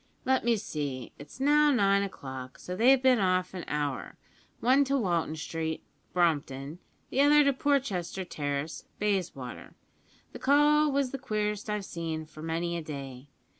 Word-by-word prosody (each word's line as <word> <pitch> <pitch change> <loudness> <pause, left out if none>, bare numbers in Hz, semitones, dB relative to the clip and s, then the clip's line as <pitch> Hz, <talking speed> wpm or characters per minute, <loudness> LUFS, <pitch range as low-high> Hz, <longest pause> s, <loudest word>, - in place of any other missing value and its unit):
"Let 260 0 +2
me 235 -1 +3
see; 145 - -4
it's 145 - -12
now 295 +2 +5
nine 200 -7 +3
o'clock, 130 -9 -6
so 180 - -6
they've 255 +6 +5
bin 255 -2 +4
off 185 -1 +1
an 180 -2 -5
hour; 145 -2 -3 0.4
one 260 +4 +4
to 275 +1 +1
Walton 170 - 0
Street, 160 0 -4 0.3
Brompton; 150 -3 0 0.3
the 270 - +2
other 295 +1 +6
to 280 -1 +3
Porchester 235 -10 -1
Terrace, 145 -1 -4
Bayswater. 185 -11 -3 0.6
The - - -8
call 295 +2 +4
was 275 -2 0
the 275 - -4
queerest 210 -4 -2
I've 210 -2 -2
seen 160 -3 -4
for 155 0 -13
many 165 +2 -2
a 170 - -2
day. 140 -3 -7
185 Hz, 155 wpm, -29 LUFS, 155-260 Hz, 0.6 s, other